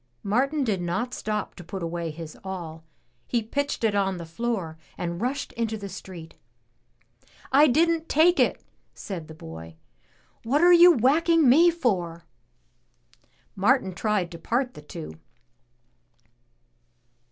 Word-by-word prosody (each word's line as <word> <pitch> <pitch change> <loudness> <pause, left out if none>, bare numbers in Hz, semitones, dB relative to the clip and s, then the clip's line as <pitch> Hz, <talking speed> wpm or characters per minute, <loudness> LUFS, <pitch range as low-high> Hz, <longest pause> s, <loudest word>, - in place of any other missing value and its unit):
Martin 270 +8 +1
did 205 -7 -1
not 205 +9 -2
stop 210 -1 -3
to 175 - -11
put 190 +2 -6
away 170 0 -3
his 155 0 -8
awl; 170 -4 -7 0.4
he 235 -2 0
pitched 280 +4 -3
it 220 -2 +2
on 195 -2 0
the 170 - -7
floor 180 -2 -3 0.2
and 170 +1 -4
rushed 255 +4 -3
into 225 -2 -2
the 200 -1 -7
street. 185 -3 -10 0.6
" 120 +1 -39 0.3
I 290 +3 +6
didn't 325 +4 +2
take 340 +4 +4
it!'' - - +1 0.3
said 175 -6 -7
the 160 - -11
boy. 80 - -10 0.7
"What 275 +7 +1
are 355 0 +7
you 350 +1 +9
whacking 315 +4 +3
me 320 +8 +6
for?" 185 - -1 1.3
Martin 200 -2 +2
tried 200 -2 -1
to 170 - -9
part 245 +7 -1
the - - -11
two. 80 - -9
210 Hz, 140 wpm, -25 LUFS, 170-265 Hz, 1.3 s, you